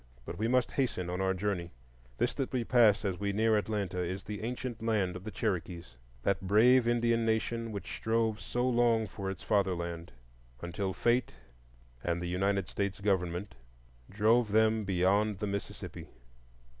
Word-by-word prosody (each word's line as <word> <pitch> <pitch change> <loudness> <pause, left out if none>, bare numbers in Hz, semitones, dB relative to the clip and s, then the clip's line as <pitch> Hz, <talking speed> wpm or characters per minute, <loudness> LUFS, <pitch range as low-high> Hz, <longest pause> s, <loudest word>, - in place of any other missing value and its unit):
But 90 - -7
we 110 - +1
must 125 +1 +2
hasten 95 -10 -1
on 90 +1 -2
our 95 0 +1
journey. 90 -3 -2 0.5
This - - +1
that 135 - -3
we 125 -2 0
pass 115 -4 +4
as 95 -3 -1
we 100 0 -1
near 110 +2 +3
Atlanta 100 -3 -1
is 90 +2 -3
the 105 0 -6
ancient 120 0 -4
land 105 -5 0
of 90 - -7
the - - -3
Cherokees,—that 85 - -3
brave 115 +6 +5
Indian 115 -1 +2
nation 115 +1 -1
which 100 -2 -6
strove 110 -1 0
so 120 +5 -1
long 120 -2 +3
for 95 -1 -5
its 95 - -6
fatherland, 85 - -1 0.5
until 95 +4 -3
Fate 120 +5 +1 0.7
and 85 0 0
the 90 - -4
United 95 +1 0
States 100 -1 -3
Government 95 -1 -1 0.6
drove 110 +2 +3
them 110 0 +3
beyond 100 +3 +2
the 105 - -3
Mississippi. 100 0 -5
100 Hz, 155 wpm, -31 LUFS, 95-115 Hz, 0.7 s, brave